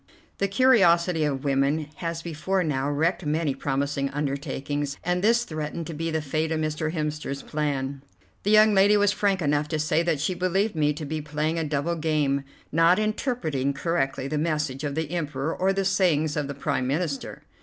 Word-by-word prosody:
The 200 - +2
curiosity 180 -8 +4
of 135 -2 -2
woman 140 +2 +1
has 165 -1 -4
before 175 +3 -1
now 140 -3 -1
wrecked 160 +6 0
many 155 -1 0
promising 140 +1 -1
undertakings, 140 0 -3
and 180 +1 0
this 235 +2 +4
threatened 155 -3 -5
to 165 - -6
be 165 +2 -3
the 160 -1 -1
fate 155 +3 -1
of 160 - 0
Mr. 155 0 -1
Hemster's 150 -3 -3
plan. 140 -2 -2 0.4
The 205 - -1
young 215 0 +6
lady 200 +2 +5
was 205 -1 +4
frank 200 -3 0
enough 145 0 +1
to 155 - -2
say 155 +1 +1
that 170 -4 0
she 160 +6 0
believed 185 +4 0
me 150 -2 +2
to 150 +1 -6
be 155 +2 -3
playing 150 +2 -1
a - - 0
double 150 +3 -1
game; 150 -3 +1 0.3
not 165 +3 +4
interpreting 215 - -1
correctly 135 -3 -1
the 150 +1 -1
message 150 -4 -1
of 145 -1 -2
the 160 -1 -2
Emperor 150 -3 -2
or 190 +1 +2
the 195 0 -1
sayings 170 -6 +2
of 150 -2 -1
the 140 - -5
Prime 130 -2 -1
Minister. 145 0 -3
155 Hz, 185 wpm, -25 LUFS, 145-175 Hz, 0.4 s, young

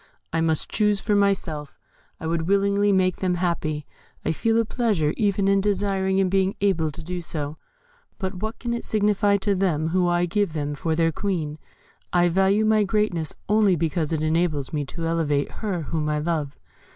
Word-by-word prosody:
I 165 - +1
must 160 -1 +1
choose 210 -2 +2
for 210 - -1
myself. 185 -7 0 0.4
I - - -7
would 165 0 -1
willingly 200 +1 +3
make 185 -2 +2
them 180 -2 0
happy. 160 -4 -1 0.4
I 160 - +2
feel 225 +7 +1
a 230 - +2
pleasure 210 -11 0
even 200 -2 +1
in 195 0 +3
desiring 195 -1 0
and 190 - +3
being 190 +1 +1
able 185 -6 +1
to 155 +3 -8
do 180 +2 -4
so 150 -2 -4 0.6
but 190 -3 -3
what 220 +1 -3
can 235 -1 -3
it 235 - -3
signify 205 -1 +2
to 200 +1 0
them 170 -5 0
who 180 +1 +2
I 175 0 +2
give 195 -1 0
them 145 -2 -2
for 160 +3 -1
their 165 0 +2
Queen? 160 -5 -3 0.5
I 175 0 +3
value 195 +4 +3
my 215 -1 +4
greatness 195 -6 0
only 210 -2 +4
because 160 -1 -1
it 155 -1 -1
enables 155 -3 0
me 145 -2 -1
to 165 +4 -5
elevate 155 -4 0
her 190 -7 -2
whom 150 0 -2
I 150 - 0
love. 150 -2 -2
180 Hz, 190 wpm, -24 LUFS, 160-200 Hz, 0.6 s, my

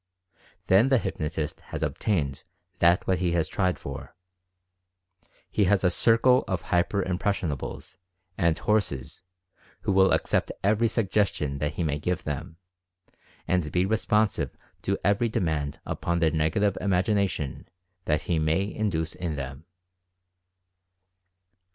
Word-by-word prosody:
Then 100 +8 +5
the 135 - +5
hypnotist 75 -7 -3
has - - -5
obtained 75 -10 -1 0.4
that 85 +1 +4
which 95 -1 +1
he 90 -2 0
has 85 -2 +1
tried 90 -2 0
for. 70 +3 -8 1.4
He 105 - +2
has 95 +1 +3
a 90 - +4
circle 120 +6 +4
of 95 -1 -2
"hyper 90 +3 +1
impres 95 +3 0
sionables" 75 -7 -5 0.4
and 85 -3 +2
"horses" 100 -11 -1 0.6
who - - 0
will 95 0 +5
accept - - +1
every 110 +3 +3
sugges 105 -2 +1
tion 70 -2 -3
that 75 +1 -1
he 85 - -1
may 75 -2 -1
give 90 +3 -2
them, 80 +3 -5 0.9
and 85 -4 0
be 90 +1 +2
responsive 110 0 +1 0.2
to - - 0
every 100 +5 +2
demand 80 -10 -1
upon 85 0 -2
their 80 -2 +2
Negative 85 +6 +1
Imagination 95 - 0 0.4
that 75 -1 +1
he 85 -2 0
may 80 +6 0
induce 85 -7 -1
in 85 -4 -4
them. 70 +2 -6
90 Hz, 130 wpm, -27 LUFS, 80-100 Hz, 1.4 s, Then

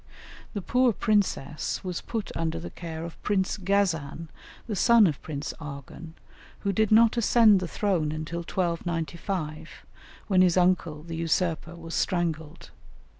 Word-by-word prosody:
The 200 - -3
poor 250 +2 +3
princess 195 -10 0
was 180 -2 -4
put 225 -3 -4
under 165 0 -2
the 170 - -7
care 165 -1 -6
of 170 - -10
Prince 195 -2 0
Ghazan, 175 -5 0 0.4
the 220 - -3
son 230 +3 +6
of 155 -6 0
Prince 145 -2 -5
Arghun, 150 +2 -9 0.5
who 200 -1 0
did 220 +2 +1
not 225 +2 +6
ascend 225 -3 +5
the 180 - -3
throne 175 -6 0
until 155 +2 -4
1295, 170 -2 -3 0.4
when 190 -4 +3
his 180 -1 +4
uncle, 175 -4 +2
the 165 0 -6
usurper, 165 0 -1
was 165 0 -9
strangled. 160 -4 -2
170 Hz, 140 wpm, -27 LUFS, 160-200 Hz, 0.5 s, son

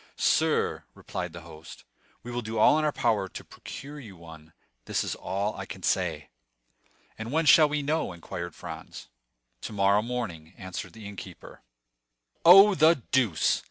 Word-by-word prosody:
"Sir," - - +1
replied 90 -1 -6
the 85 +1 -10
host, 80 0 -13 0.4
"we 120 - -7
will 120 0 -3
do 110 0 -5
all 145 +8 +5
in - - -1
our 150 - +2
power 110 -8 0
to - - -9
procure 145 +2 -10
you 105 -9 -12
one—this 80 -7 -7
is - - -3
all 100 +3 -3
I - - -7
can - - -9
say." 80 -6 -1 0.9
"And 110 +2 -5
when 160 +2 +1
shall 150 +2 +7
we 150 0 -2
know?" 155 -5 -1
inquired 85 -1 -7
Franz. - - -9 0.5
"Tomorrow 100 0 +2
morning," 100 -9 -5
answered 95 -1 -7
the 110 -2 -10
innkeeper. 100 -3 -11 0.8
"Oh, 195 +4 +9
the 160 0 +5 0.2
deuce! 115 -12 +2
105 Hz, 155 wpm, -27 LUFS, 85-140 Hz, 0.9 s, Oh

